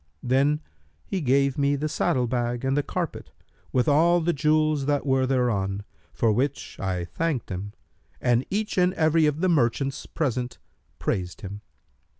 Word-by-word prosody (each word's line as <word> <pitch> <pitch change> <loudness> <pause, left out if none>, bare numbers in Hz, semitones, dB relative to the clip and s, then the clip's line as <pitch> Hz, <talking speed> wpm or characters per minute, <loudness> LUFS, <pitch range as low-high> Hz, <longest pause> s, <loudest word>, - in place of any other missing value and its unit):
Then 140 +4 +2 0.4
he 190 - -2
gave 140 0 +2
me 140 0 +3
the 150 +2 -1
saddle 130 -4 +1
bag 120 0 -1
and 135 +1 +1
the 145 - +3
carpet, 170 +2 -4 0.4
with 125 -2 +2
all 170 +4 +5
the 170 +1 +1
jewels 155 -1 +2
that 145 -1 +1
were 130 -1 +2
thereon, 105 -7 0 0.3
for 110 +7 +2
which 135 +6 -2
I 90 -2 -2
thanked 140 - -2
him, 100 +3 -5 0.5
and 120 0 +2
each 210 -1 -1
and 180 +1 +3
every 160 0 +3
of 150 +2 -1
the 185 - +3
merchants 135 -3 +1
present 125 -5 -2 0.4
praised 90 -2 -2
him. 100 +1 -7
135 Hz, 155 wpm, -25 LUFS, 120-155 Hz, 0.5 s, all